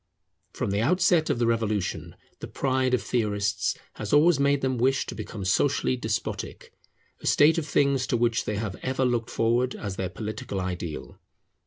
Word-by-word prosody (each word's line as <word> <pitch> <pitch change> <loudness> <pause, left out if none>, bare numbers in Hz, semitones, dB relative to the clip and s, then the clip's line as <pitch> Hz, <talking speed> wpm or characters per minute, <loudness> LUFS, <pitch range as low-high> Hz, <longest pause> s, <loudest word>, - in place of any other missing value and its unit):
From 120 -6 -2
the 100 +1 0
outset 170 +3 +3
of - - +1
the 120 - +1
Revolution, 110 -4 -1 0.2
the - - -6
pride 130 -1 +1
of - - -3
theorists 105 -3 0 0.2
has 105 - -5
always 150 +1 +5
made 140 0 +2
them 130 -2 -1
wish 135 +3 +2
to - - -6
become 100 -4 -6
socially 130 +7 +2
despotic; 110 -4 -4 0.5
a - - -5
state 155 +3 +5
of 155 - -5
things 140 -3 +2
to 120 - +1
which 115 -1 +1
they 105 - -2
have 100 -2 -3
ever 130 0 0
looked 120 -2 0
forward 120 +2 +1
as 100 -2 -5
their 95 -1 -2
political 105 +2 -5
ideal. 90 -4 -5
120 Hz, 175 wpm, -26 LUFS, 105-135 Hz, 0.5 s, always